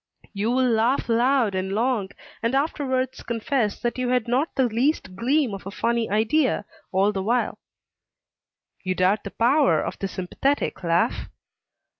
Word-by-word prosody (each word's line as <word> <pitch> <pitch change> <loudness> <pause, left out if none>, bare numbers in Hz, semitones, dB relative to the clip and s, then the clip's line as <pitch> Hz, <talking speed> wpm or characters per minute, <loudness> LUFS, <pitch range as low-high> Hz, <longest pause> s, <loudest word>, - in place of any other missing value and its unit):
You 205 +2 -1
will 255 +1 +2
laugh 235 +3 +1
loud 240 -1 +3
and 190 +1 -2
long, 225 -3 0 0.3
and 230 +3 0
afterwards 260 -3 -1
confess 230 -1 -1
that 240 +1 -2
you 250 -1 0
had 250 -2 +1
not 260 +7 +1
the 265 - +3
least 240 - 0
gleam 255 +3 +1
of 195 -1 -7
a - - -3
funny 230 +2 -1
idea, 220 +2 +1 0.3
all 195 +2 +3
the 195 -2 -3
while. 235 +5 0 1.2
You 185 -1 -1
doubt 185 +3 +2
the 200 - -5
power 265 +7 +3
of - - -4
the 195 - -2
sympathetic 190 +7 -2
laugh? 170 0 0
235 Hz, 155 wpm, -24 LUFS, 200-260 Hz, 1.2 s, loud